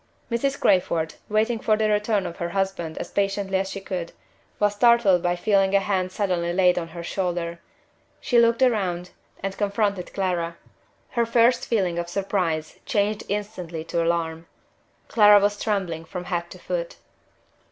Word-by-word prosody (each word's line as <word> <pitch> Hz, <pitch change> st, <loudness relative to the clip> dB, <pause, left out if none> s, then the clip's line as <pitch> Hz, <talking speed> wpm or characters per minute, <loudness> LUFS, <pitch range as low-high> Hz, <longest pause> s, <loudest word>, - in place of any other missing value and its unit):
Mrs. 270 Hz, +4 st, 0 dB
Crayford, 165 Hz, -3 st, +2 dB, 0.2 s
waiting 220 Hz, +2 st, +1 dB
for 215 Hz, 0 st, +2 dB
the 215 Hz, 0 st, +1 dB
return 210 Hz, -1 st, +1 dB
of 170 Hz, -1 st, -6 dB
her 170 Hz, -, -3 dB
husband 190 Hz, -4 st, -2 dB
as -, -, -6 dB
patiently 195 Hz, -1 st, 0 dB
as 195 Hz, 0 st, -2 dB
she 195 Hz, -, -5 dB
could, 185 Hz, -3 st, -5 dB, 0.5 s
was 205 Hz, -1 st, +2 dB
startled 210 Hz, -4 st, +4 dB
by 175 Hz, 0 st, +1 dB
feeling 195 Hz, +1 st, +2 dB
a -, -, +6 dB
hand 190 Hz, -2 st, -1 dB
suddenly 180 Hz, -4 st, -1 dB
laid 180 Hz, -1 st, +4 dB
on 165 Hz, -, -5 dB
her 170 Hz, +1 st, -8 dB
shoulder. 175 Hz, -2 st, -2 dB, 0.6 s
She 240 Hz, -, +3 dB
looked 235 Hz, +2 st, +4 dB
round, 185 Hz, -8 st, 0 dB, 0.3 s
and 195 Hz, 0 st, -3 dB
confronted 200 Hz, -2 st, -1 dB
Clara. 175 Hz, -3 st, -2 dB, 0.5 s
Her 235 Hz, -1 st, +1 dB
first 235 Hz, +1 st, +3 dB
feeling 185 Hz, -6 st, 0 dB
of 170 Hz, 0 st, -4 dB
surprise 175 Hz, -5 st, -2 dB
changed 210 Hz, 0 st, 0 dB
instantly 185 Hz, -6 st, -4 dB
to 165 Hz, +1 st, -1 dB
alarm. 165 Hz, -1 st, -1 dB, 0.6 s
Clara 210 Hz, -2 st, +7 dB
was 205 Hz, 0 st, 0 dB
trembling 185 Hz, -7 st, -2 dB
from 180 Hz, +2 st, -6 dB
head 175 Hz, -1 st, -3 dB
to -, -, -11 dB
foot. -, -, -4 dB
195 Hz, 160 wpm, -24 LUFS, 175-210 Hz, 0.6 s, Clara